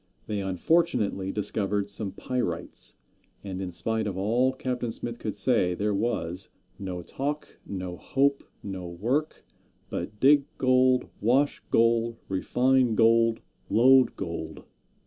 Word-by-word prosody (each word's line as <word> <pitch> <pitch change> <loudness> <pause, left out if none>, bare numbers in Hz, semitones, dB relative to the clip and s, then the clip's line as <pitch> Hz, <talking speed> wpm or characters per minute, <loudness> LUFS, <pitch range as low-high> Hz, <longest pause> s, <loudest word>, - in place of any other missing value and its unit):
They 105 -2 -2
unfortunately 100 - +1
discovered 105 -1 -1
some 100 -1 -3
pyrites, 125 +3 -3 0.5
and 95 -2 -5
in 95 - -3
spite 110 +5 0
of 95 -2 -4
all 120 +7 +2
Captain 125 -2 -3
Smith 120 +1 -4
could 105 - -4
say, 100 -4 +2
there 105 +3 0
was 100 -4 -2 0.3
"no 90 -3 -5
talk, 145 - -4
no 90 -2 -5
hope, 140 +6 +1 0.2
no 95 -3 -5
work, 120 - -2 0.5
but 105 +5 -5
dig 140 +2 +5
gold, 130 0 +3
wash 130 +6 +2
gold, 115 0 +2
refine 125 +5 +2
gold, 115 0 +4 0.3
load 130 +3 +5
gold." 85 -4 -6
110 Hz, 125 wpm, -27 LUFS, 95-130 Hz, 0.5 s, dig